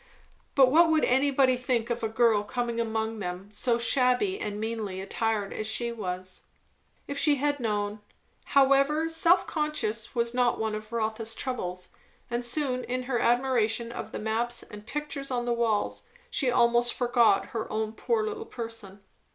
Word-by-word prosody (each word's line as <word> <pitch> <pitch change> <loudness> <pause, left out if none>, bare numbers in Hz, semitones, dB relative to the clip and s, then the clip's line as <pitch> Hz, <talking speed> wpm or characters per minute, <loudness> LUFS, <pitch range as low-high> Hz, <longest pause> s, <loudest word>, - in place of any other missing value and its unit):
But 265 -2 +6
what 330 +3 +6
would 315 -1 +3
anybody 265 0 +3
think 245 -2 -1
of 235 - -2
a 225 - -1
girl 225 -2 +3
coming 235 +2 -3
among 220 -1 -2
them 180 +1 -5
so 235 +4 +1
very 235 0 0
shabby 255 - +2
and 210 0 -4
meanly 220 -4 -3
attired 205 +1 -2
as 215 - -4
she 235 +2 -2
was? 185 -4 -6 0.7
If 280 0 -4
she 295 -2 +3
had 290 +1 0
known 210 -2 -2 0.6
However, 275 +4 +4
self 335 +2 +4
consciousness 260 -9 -2
was 235 0 0
not 245 -1 +2
one 220 -1 -2
of 215 +1 -6
Rotha's 225 0 -2
troubles, 180 -8 -4 0.4
and 240 +1 -1
soon 255 0 0
in 255 +1 -2
her 250 -1 -1
admiration 235 -2 +1
of - - -6
the - - -5
maps 230 +3 -1
and 210 +1 -12
pictures 285 0 -4
on 245 -2 -1
the 240 - +1
walls 230 - -1 0.2
she 270 - +1
almost 240 0 +3
forgot 240 -5 +3
her 225 -2 -3
own 220 0 -2
poor 450 - 0
little 435 +1 -4
person. 225 -4 -7
235 Hz, 170 wpm, -28 LUFS, 220-260 Hz, 0.7 s, But